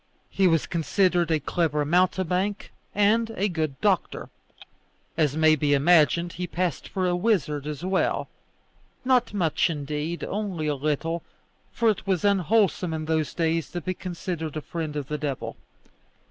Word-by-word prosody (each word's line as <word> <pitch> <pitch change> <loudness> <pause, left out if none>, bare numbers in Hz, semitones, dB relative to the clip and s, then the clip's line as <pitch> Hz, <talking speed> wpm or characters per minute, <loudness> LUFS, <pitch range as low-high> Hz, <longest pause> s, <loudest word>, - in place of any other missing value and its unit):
He 195 -1 +3
was 165 -3 +2
considered 175 0 +1
a 160 -1 +2
clever 150 -1 0
mountebank 185 +4 +1 0.2
and 220 +3 +3
a 200 - +1
good 155 -7 -3
doctor. - - 0 0.9
As 150 -2 +1
may 155 0 +5
be 145 -1 +2
imagined, 170 +3 +4
he 180 +1 -4
passed 175 -5 -2
for 185 -1 -1
a 175 -1 +1
wizard 160 - 0
as 150 +3 -5
well 190 0 0 0.8
not 250 -2 +3
much 175 -7 +1
indeed; 150 +2 -3
only 195 -6 -3
a 150 - +1
little, 155 +4 -1 0.5
for 230 - 0
it 210 -2 +1
was 190 -1 +1
unwholesome 195 -3 +2
in 155 0 -4
those 160 -1 -1
days 165 -2 0
to 175 - -3
be 185 +4 -2
considered 170 -4 -5
a - - -3
friend 160 -1 -5
of 145 -3 -3
the 150 +1 -3
devil. 140 -3 -4
170 Hz, 155 wpm, -25 LUFS, 150-185 Hz, 0.9 s, may